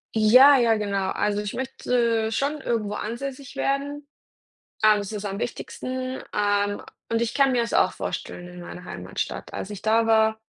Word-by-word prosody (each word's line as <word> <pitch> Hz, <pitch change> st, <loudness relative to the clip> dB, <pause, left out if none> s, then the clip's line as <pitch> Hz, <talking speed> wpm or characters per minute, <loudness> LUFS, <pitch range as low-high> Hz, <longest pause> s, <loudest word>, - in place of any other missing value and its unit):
Ja, 250 Hz, +6 st, +8 dB
ja, 235 Hz, -3 st, +4 dB
genau. 200 Hz, -3 st, -1 dB
Also, 205 Hz, 0 st, 0 dB
ich 205 Hz, -1 st, -5 dB
möchte 235 Hz, -3 st, 0 dB
schon 280 Hz, +6 st, -1 dB
irgendwo 215 Hz, -5 st, -1 dB
ansässig 265 Hz, +4 st, -5 dB
werden. 280 Hz, +1 st, -2 dB, 0.8 s
Ähm, 215 Hz, -1 st, +6 dB
das 200 Hz, 0 st, -5 dB
ist 210 Hz, -1 st, -5 dB
am 200 Hz, 0 st, -4 dB
wichtigsten. 255 Hz, +2 st, -4 dB
Ähm, 205 Hz, 0 st, +1 dB, 0.3 s
und 230 Hz, 0 st, 0 dB
ich 235 Hz, -1 st, -1 dB
kann 275 Hz, -1 st, +4 dB
mir 245 Hz, -2 st, +2 dB
das 230 Hz, -, -5 dB
auch -, -, +3 dB
vorstellen 175 Hz, -, -5 dB
in 180 Hz, 0 st, -10 dB
meiner 180 Hz, +1 st, -9 dB
Heimatstadt. 90 Hz, -, -5 dB
Als 195 Hz, -, -5 dB
ich 205 Hz, -, -7 dB
da 225 Hz, +1 st, +3 dB
war 220 Hz, -1 st, +3 dB
225 Hz, 170 wpm, -24 LUFS, 205-255 Hz, 0.8 s, Ja